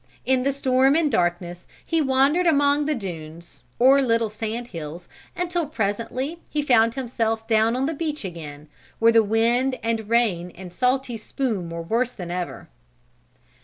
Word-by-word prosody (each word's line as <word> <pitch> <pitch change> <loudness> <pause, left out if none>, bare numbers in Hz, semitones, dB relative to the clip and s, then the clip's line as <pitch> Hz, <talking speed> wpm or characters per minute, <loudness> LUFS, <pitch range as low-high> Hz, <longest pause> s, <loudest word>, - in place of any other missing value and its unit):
In 260 -1 +2
the 275 +2 +1
storm 265 0 +2
and 320 -3 +2
darkness 175 0 -1 0.2
he 330 -1 +1
wandered 280 +6 +3
among 290 -1 +3
the 305 - +1
dunes, 165 - -8 0.2
or 270 +3 +6
little 230 -4 +1
sand 225 +2 -5
hills, 165 +1 -8 0.3
until 350 -2 -1
presently 250 +5 -3
he 300 -1 -1
found 230 -4 +3
himself 225 -4 -2
down 225 +1 +2
on 260 +2 0
the 320 - -1
beach 305 -5 -3
again, 155 -4 -8 0.3
where 230 0 +5
the 230 0 +6
wind 235 +5 +1
and 225 -2 -2
rain 210 -7 +1
and 180 -1 -10
salty 255 +1 0
spume 215 -6 -3
were 165 0 -5
worse 235 +8 0
than 175 -3 -7
ever. 180 0 -5
230 Hz, 160 wpm, -23 LUFS, 190-270 Hz, 0.3 s, or